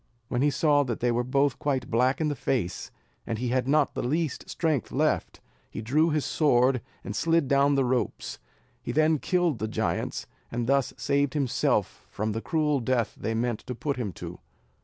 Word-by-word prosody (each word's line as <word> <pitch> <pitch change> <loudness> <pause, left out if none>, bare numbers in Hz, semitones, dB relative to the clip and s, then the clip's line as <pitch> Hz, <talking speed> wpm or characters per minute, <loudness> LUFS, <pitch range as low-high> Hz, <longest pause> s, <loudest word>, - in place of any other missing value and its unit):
When 125 - 0
he 145 - +4
saw 145 0 +3
that 120 -3 -3
they 120 0 +2
were 120 +1 +1
both 135 +1 +1
quite 130 -4 -1
black 125 +3 +2
in 160 - +1
the 145 - -1
face, 115 -8 -2 0.4
and 115 - -2
had 125 +2 0
not 150 0 +3
the - - -2
least 150 +3 -2
strength 155 -7 -1
left, - - 0 0.3
he - - -6
drew 150 +8 +3
his 150 -2 0
sword, 130 -4 +3 0.2
and 105 - -5
slid 165 0 +2
down 140 +1 +4
the 135 -1 +2
ropes; 125 0 -2 0.4
he - - -4
then 155 +3 +3
killed 175 - +1
the 110 - -1
giants, 110 - -2 0.3
and 120 0 -1
thus 135 +1 +2
saved 140 0 +1
himself 135 -5 0
from 110 +1 -2
the 110 +2 -3
cruel 150 -1 +1
death 120 -2 0
they 110 +1 -3
meant 120 -1 0
to 125 - -4
put 140 +3 -2
him 115 -6 -2
to. - - -8
130 Hz, 190 wpm, -27 LUFS, 120-150 Hz, 0.4 s, he